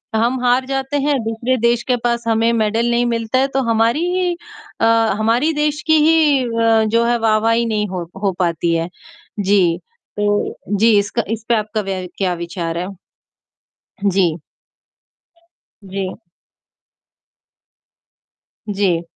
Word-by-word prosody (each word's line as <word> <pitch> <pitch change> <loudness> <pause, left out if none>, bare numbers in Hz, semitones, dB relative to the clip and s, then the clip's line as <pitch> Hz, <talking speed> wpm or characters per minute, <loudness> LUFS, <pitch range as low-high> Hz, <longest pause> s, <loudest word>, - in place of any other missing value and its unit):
हम 240 +3 +1
हार 250 +1 +2
जाते 270 +1 -2
हैं 285 -1 +1
दूसरे 230 +3 -1
देश 235 +1 +1
के 250 - +3
पास 235 0 0
हमें 225 +1 +2
मैडल 225 +1 +1
नहीं 240 +1 +2
मिलता 230 +1 0
है 270 - +2
तो 270 - +3
हमारी 230 +4 +2 0.2
ही 365 -1 +1 0.5
अ, - - +4 0.3
हमारी 240 +9 +2
देश 300 0 -1
की 315 - +5
ही 300 -5 +4
अ, 230 -1 +2
जो 230 +2 +2
है 240 0 +2
वाह-वाही 225 +1 +2
नहीं 210 -2 -1
हो 180 -2 -4 0.2
हो 195 - +2
पाती 170 -1 0
है। 165 +1 -2 0.5
जी, 190 -4 +2 0.4
तो 205 0 0 0.2
जी 225 -1 +5
इसका 215 +3 -1
इसपे 225 +1 -1
आपका 215 0 -2 0.3
क्या 185 -2 0
विचार 170 -1 -4
है? 180 +2 -3 1.2
जी। 185 -4 +2 1.5
जी। 190 -1 -4 2.5
जी। 195 -4 0
225 Hz, 130 wpm, -18 LUFS, 200-240 Hz, 2.5 s, की